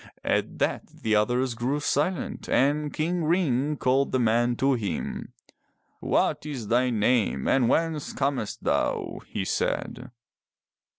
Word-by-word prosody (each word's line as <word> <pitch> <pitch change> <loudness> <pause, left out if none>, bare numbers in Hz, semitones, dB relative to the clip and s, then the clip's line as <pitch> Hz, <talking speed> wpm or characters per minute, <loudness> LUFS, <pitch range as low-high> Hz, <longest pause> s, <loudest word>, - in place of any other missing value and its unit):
At - - 0
that - - -1
the 110 -1 -1
others 125 +4 +1
grew 125 +5 -1
silent 150 +5 -1
and 145 +2 +2
King 170 +2 -1
Ring 150 -4 +1
called 135 +2 +2
the 130 - +1
man 120 +1 +2
to 135 +3 +2
him. 110 -6 -3 0.7
"What - - +1
is 135 -8 -6
thy 125 +2 +3
name 110 - +1
and 125 -3 +3
whence 160 -3 0
camest 135 -6 -2
thou?'' - - 0
he - - -3
said. 125 - -2
130 Hz, 130 wpm, -26 LUFS, 120-150 Hz, 0.7 s, thy